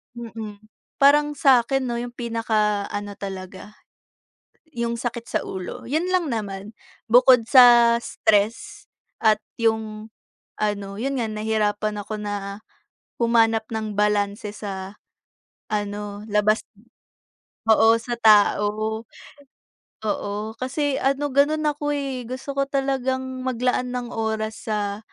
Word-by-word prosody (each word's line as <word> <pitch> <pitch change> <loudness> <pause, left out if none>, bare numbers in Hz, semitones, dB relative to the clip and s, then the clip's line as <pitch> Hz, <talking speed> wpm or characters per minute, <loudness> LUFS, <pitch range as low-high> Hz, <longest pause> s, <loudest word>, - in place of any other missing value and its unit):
Mm. 225 -3 -8 0.4
Parang 295 +1 +5
sakin 265 -1 +3
'no, 240 - -2
yung 240 0 -4
pinaka 220 -3 0
ano 205 0 -5
talaga, 190 +1 -8 1.0
yung 235 0 -2
sakit 235 0 -4
sa - - 0
ulo. 190 +6 -6
Yun 315 +8 -1
lang 365 -3 +1
naman. 205 -1 -5 0.3
Bukod 245 0 +6
sa 240 -2 +7
stress 230 - 0 0.3
at 215 -2 +4 0.2
yung 220 -1 -1 0.5
ano, 200 -2 -2
yun 275 +1 -1
nga, 225 -3 -1
nahirapan 215 -1 -1
ako 215 +1 -6
na 205 0 -5 0.6
humanap 225 -2 +3
ng 220 -1 -3
balanse 205 0 0
sa, 195 -1 -6 0.8
ano, 205 0 -3
labas 210 +1 +2 1.1
oo, 225 +1 +6
sa 240 +1 -4
tao. 215 0 +3 1.0
Oo, 210 0 -3
kasi 275 +2 -1
ano, 275 +1 0
gano'n 300 +3 +3
ako, 295 0 -1
eh. 270 -3 -3
Gusto 260 +3 -5
ko - - +4
talagang 260 -1 -2
maglaan 250 0 0
ng 245 -1 -3
oras 220 0 -3
sa 205 -1 -2
225 Hz, 115 wpm, -23 LUFS, 210-255 Hz, 1.1 s, sa